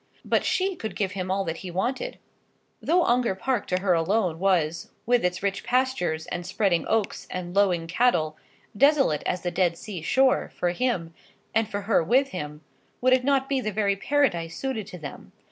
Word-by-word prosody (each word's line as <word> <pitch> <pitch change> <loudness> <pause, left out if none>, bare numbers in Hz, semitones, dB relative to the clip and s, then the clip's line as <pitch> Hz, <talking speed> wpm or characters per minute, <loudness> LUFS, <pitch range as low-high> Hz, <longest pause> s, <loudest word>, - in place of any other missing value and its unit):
But - - +2
she 385 0 0
could 220 -10 -6
give 195 -3 -1
him 185 -2 -4
all 195 +1 +1
that 165 0 -3
he 185 - -7
wanted. 250 - -2 0.6
Though 350 +2 +3
Ongar 240 -7 +2
Park 255 +6 -1
to 180 0 0
her 190 -2 +3
alone 175 0 +1
was, 170 -4 +1 0.2
with 245 +1 +3
its 180 +1 -1
rich 200 0 -1
pastures 250 -11 0
and 175 - -4
spreading 185 -1 0
oaks 220 -3 -1
and 180 -1 -5
lowing 185 -5 +3
cattle, 165 -5 +1 0.4
desolate 270 - +4
as 180 -1 -2
the 175 - -1
Dead 175 -1 +1
Sea 195 -4 -7
shore, 260 +10 +2
for 175 - 0
him, 180 -6 -1 0.4
and 220 -1 +1
for 205 -1 -3
her 200 -4 +2
with 260 - +3
him, 150 -4 -6 0.4
would 255 +1 +4
it 255 0 +3
not 270 0 +2
be 270 -1 0
the 215 - -2
very 200 -1 +1
paradise 195 - 0
suited 255 -7 -3
to 180 - -8
them? 150 -4 -9
195 Hz, 190 wpm, -26 LUFS, 175-250 Hz, 0.6 s, desolate